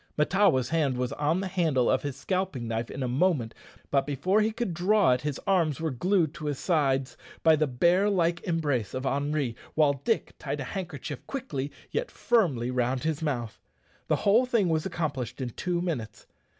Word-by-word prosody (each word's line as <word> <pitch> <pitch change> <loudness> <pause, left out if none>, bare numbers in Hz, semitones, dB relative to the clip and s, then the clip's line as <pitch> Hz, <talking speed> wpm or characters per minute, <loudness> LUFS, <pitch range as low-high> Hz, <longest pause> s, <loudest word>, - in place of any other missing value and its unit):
Mahtawa's 150 -6 +3
hand 150 -6 +1
was 125 -1 -1
on 155 +5 0
the 195 - -2
handle 160 -9 +1
of 130 - +2
his 145 -3 -4
scalping 180 -6 -2
knife 115 +1 -2
in 135 - -4
a - - -1
moment, 130 -3 +1 0.4
but 140 0 +2
before 180 +9 +2
he 215 +1 +1
could 220 -4 -3
draw 190 0 +3
it 125 0 +2
his 145 -2 -3
arms 170 -8 +2
were 160 -1 -1
glued 170 +3 +1
to 155 -3 -6
his 145 -2 -1
sides 135 -6 +1 0.3
by 160 -1 +6
the 155 0 +1
bear 175 +10 +3
like 170 -3 +1
embrace 145 - -1
of 130 +1 -3
Henri, 140 -2 -1 0.2
while 150 -2 +4
Dick 225 - 0
tied - - -4
a - - -2
handkerchief 160 - -6
quickly 145 - -4 0.2
yet 485 +2 -1
firmly 150 - +1
round 125 0 0
his 160 -1 -1
mouth. 120 -8 -3 0.5
The - - +3
whole 225 +5 +5
thing 225 -7 +2
was 160 +1 0
accomplished 140 - -3
in 125 -2 -3
two 175 +6 -2
minutes. 120 - -4
150 Hz, 190 wpm, -28 LUFS, 130-180 Hz, 0.5 s, by